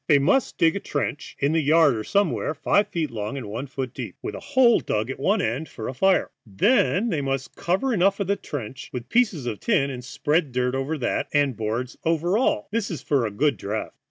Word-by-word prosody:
They 145 - +6
must 185 - +2
dig 165 -1 +3
a - - -1
trench, 145 -4 -4
in 140 +2 +1
the 160 0 +2
yard 155 -2 +4
or 110 - -3
somewhere, 200 - 0
five 205 +5 +2
feet 160 -4 -2
long 110 +3 -4
and 130 - -6
one 115 +7 -5
foot 130 -1 -5
deep, - - -6
with - - -4
a - - -6
hole 245 -3 +4
dug 110 +4 -2
at - - -7
one 200 +8 +2
end 130 +8 -2
for 110 - -7
a - - -4
fire. 190 +8 +2
Then 200 - +2
they 160 -7 0
must 135 -1 -3
cover 195 +10 0
over 195 0 +2
the 200 +2 0
trench 130 - -7
with 125 0 -6
pieces 210 - +2
of 115 -4 -3
tin 145 -12 +1
and 125 -1 -7
spread 150 +2 0
dirt 125 0 0
over 135 +4 -2
that, 130 - -1
and 145 -3 +3
boards 115 +4 -3
over 165 +3 +1
all; 245 - +1
this 225 -1 -1
is 165 -7 -5
for 135 -6 +1
a - - -5
good 140 +4 +1
draught. 105 +3 -4
145 Hz, 225 wpm, -24 LUFS, 125-185 Hz, -, They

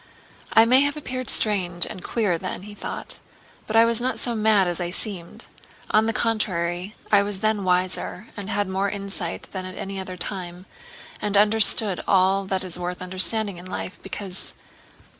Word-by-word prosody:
"I 225 - +7
may 255 +3 +6
have 285 +2 +1
appeared 255 -4 -4
strange 180 -5 +3
and 185 - -8
queer 200 -8 0
then," 185 +1 -5
he 210 +1 -9
thought, - - -4 0.5
"but 220 - -3
I 225 +1 +7
was 230 0 +1
not 255 +1 -1
so 240 - 0
mad 215 -3 +3
as 175 0 -2
I 175 - -2
seemed. 180 -2 -4 0.5
On 220 +1 +4
the - - +2
contrary 190 -4 -1 0.2
I 205 -1 +7
was 200 -1 -3
then 215 -2 +1
wiser 185 +3 -1
and 205 -1 -6
had 205 -2 0
more 190 +1 0
insight 195 -3 -4
than 190 -1 -5
at 185 0 -8
any 195 0 -5
other 185 -1 -6
time, 180 -1 -5 0.6
and 205 -1 +1
understood 210 -2 +4
all 195 +1 +3
that 190 -1 -1
is 180 -1 -2
worth 180 0 -4
understanding 185 +2 +3
in 175 - -11
life, 185 - -5
because... 195 -1 -6
195 Hz, 180 wpm, -24 LUFS, 185-215 Hz, 0.6 s, I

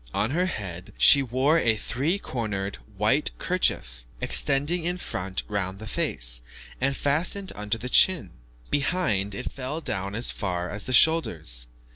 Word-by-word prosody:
On 105 +5 +1
her 180 +4 +1
head 95 - -5
she 140 - +7
wore 135 +5 +2
a 115 -7 +3
three 140 - -1
cornered 105 - -4 0.2
white 110 +9 +3
kerchief, - - 0 0.2
extending 145 +5 +1
in 175 +2 0
front 95 - -3
round 100 -2 -2
the 110 - -8
face, 65 - -1 0.4
and 135 +1 +1
fastened 175 +7 0
under 105 +2 -2
the 120 +3 -6
chin; 125 - +4 0.4
behind, 135 - 0
it 125 - -4
fell 135 +4 -4
down 100 - -3
as 115 - +3
far 90 -3 -3
as 105 +3 -6
the - - -3
shoulders. 80 - +2
115 Hz, 150 wpm, -26 LUFS, 95-150 Hz, 0.4 s, she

